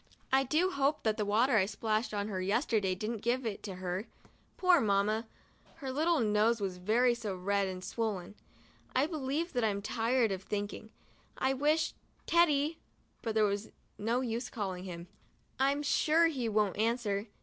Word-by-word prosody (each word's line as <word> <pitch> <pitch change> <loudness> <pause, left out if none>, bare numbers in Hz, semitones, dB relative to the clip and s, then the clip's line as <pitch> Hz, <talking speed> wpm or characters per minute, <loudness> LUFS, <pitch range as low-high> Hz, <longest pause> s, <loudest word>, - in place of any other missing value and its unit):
I 265 0 +5
do 315 +8 +1
hope 280 0 +1
that 215 -1 +1
the 210 - 0
water 225 +4 +3
I 190 -2 +3
splashed 220 +2 -1
on 205 -1 -2
her 190 -3 -3
yesterday 200 -1 +1
didn't 215 +4 -3
give 245 +2 0
it 215 -3 -3
to 195 -3 -6
her. 185 +3 -4 0.5
Poor 360 -4 +5
Mamma! 215 +2 +1 0.5
her 275 -5 -5
little 315 +4 +2
nose 220 +1 +2
is 195 -2 -2
so 180 - -13
very 240 +5 +3
red 200 0 0
and 185 -1 -6
swollen. 205 -5 -3 0.6
I 260 +2 +4
believe 310 +1 -2
that 245 -2 0
I'm 200 -2 0
tired 230 +1 +1
of 190 -1 -3
thinking. 205 +2 -4 0.5
I 265 0 +1
wish 300 +4 +1 0.3
Teddy 315 -2 +3 0.2
— - - -39
but 225 -2 -3
there's 205 -1 +1 0.3
no 230 +4 0
use 240 0 -3
calling 190 -4 -4
to - - -6
him. 170 0 -7 0.5
I'm 280 +2 +2
sure 315 +3 +3
he 255 -7 -2
won't 210 -3 +1
answer. 220 -2 0
225 Hz, 170 wpm, -32 LUFS, 200-265 Hz, 0.6 s, I